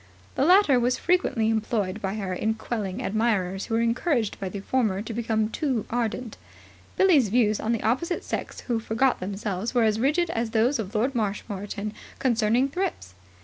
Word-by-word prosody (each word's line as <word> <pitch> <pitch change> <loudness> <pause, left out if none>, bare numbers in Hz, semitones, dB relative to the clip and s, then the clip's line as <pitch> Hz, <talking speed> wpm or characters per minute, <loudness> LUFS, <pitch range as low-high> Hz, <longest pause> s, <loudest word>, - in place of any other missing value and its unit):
The 270 - +1
latter 355 -7 +6
were 240 +1 +2
frequently 255 -5 +1
employed 215 -2 -1
by 195 +1 -2
her 195 -4 -3
in 220 +4 -1
quelling 220 0 -4
admirers 200 -4 0
who 225 - -1
were 230 - +2
encouraged 235 0 0
by 195 - -3
the 200 - -6
former 210 -3 0
to 225 - -6
become 220 -1 0
too 260 -8 -1
ardent. 235 -1 -2 0.6
Billie's 310 - +5
views 215 -1 +2
on 220 - -1
the 230 - -1
opposite 270 +11 0
sex - - -4
who 235 -3 -1
forgot 230 +4 +1
themselves 200 +3 -3
were 240 - +4
as 220 0 +2
rigid 315 +7 +1
as 230 0 -1
those 240 +4 +3
of 215 0 -5
Lord 245 +6 +1
Marshmoreton 205 -2 -3 0.2
concerning 235 0 +2
thrips. 280 - -3
225 Hz, 175 wpm, -26 LUFS, 210-255 Hz, 0.6 s, latter